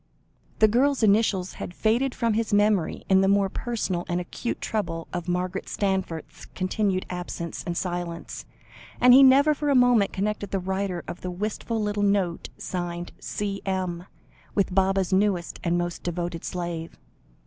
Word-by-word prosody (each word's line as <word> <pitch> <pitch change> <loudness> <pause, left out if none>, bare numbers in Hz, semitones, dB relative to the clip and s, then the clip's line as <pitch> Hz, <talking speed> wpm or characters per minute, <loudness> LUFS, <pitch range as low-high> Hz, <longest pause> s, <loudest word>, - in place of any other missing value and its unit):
The 215 - +6
girl's 255 +4 +2
initials 200 -3 +3
had 175 - -6
faded 240 +4 +1
from 230 -2 +1
his 225 0 -1
memory, 205 -5 +2
in 190 0 +5
the 195 - +3
more 200 0 +3
personal 205 -6 -2
and 175 0 0
acute 180 +6 -4
trouble 165 -7 -3
of 175 -1 -4
Margaret 180 +1 -2
Stanforth's 190 -5 -3
continued 185 0 0
absence 175 -2 -5
and 170 -1 -3
silence, 175 -2 -4 0.5
and 250 0 +7
he 265 - +9
never 275 +3 +7
for 295 0 -2
a 280 - +4
moment 245 -5 +4
connected 205 0 -2
the 195 - -1
writer 190 -1 -2
of 180 - -7
the 180 - -4
wistful 215 +4 -3
little 210 -1 -1
note 200 -4 +1
signed 175 -1 -4
"C.M.," 190 -4 -3 0.5
with 195 -2 +1
Baba's 190 0 +2
newest 190 -3 +1
and 175 0 +1
most 175 0 -3
devoted 175 -1 -3
slave. 170 -2 -4
190 Hz, 155 wpm, -25 LUFS, 175-215 Hz, 0.5 s, he